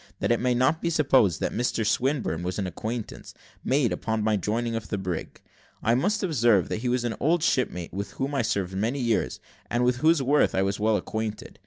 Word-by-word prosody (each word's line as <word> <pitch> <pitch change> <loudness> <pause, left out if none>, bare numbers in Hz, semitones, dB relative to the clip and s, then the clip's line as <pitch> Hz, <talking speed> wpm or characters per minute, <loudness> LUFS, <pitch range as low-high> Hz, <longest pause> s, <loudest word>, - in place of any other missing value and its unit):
That - - 0
it 120 - +3
may 125 0 +1
not 130 +6 +2
be 170 - 0
supposed 135 - +3
that - - 0
Mr 115 -1 0
Swinburne 125 - 0
was 90 +1 -3
a 100 - -1
new 95 - -3
acquaintance, 110 +4 -6 0.3
made 135 -2 +2
upon 110 -1 -2
my 110 0 +2
joining 115 +4 -1
the 110 -2 -3
brig, 90 -4 -5 0.4
I 115 - +3
must 200 - +1
observe, 120 - +3
that - - -1
he 125 - -1
was 125 0 0
an 120 -2 -1
old 165 +2 +2
shipmate, 90 - 0
with 100 0 -5
whom 135 +2 -3
I 140 - 0
had 115 - 0
served 95 -2 -1
many 115 +8 -1
years, 115 -4 0 0.3
and 120 +1 +1
with 125 0 +2
whose 160 +4 +4
worth 140 +2 +2
I 95 - +2
was 100 +1 -1
well 110 0 +2
acquainted. 110 0 -5
120 Hz, 220 wpm, -26 LUFS, 105-135 Hz, 0.4 s, whose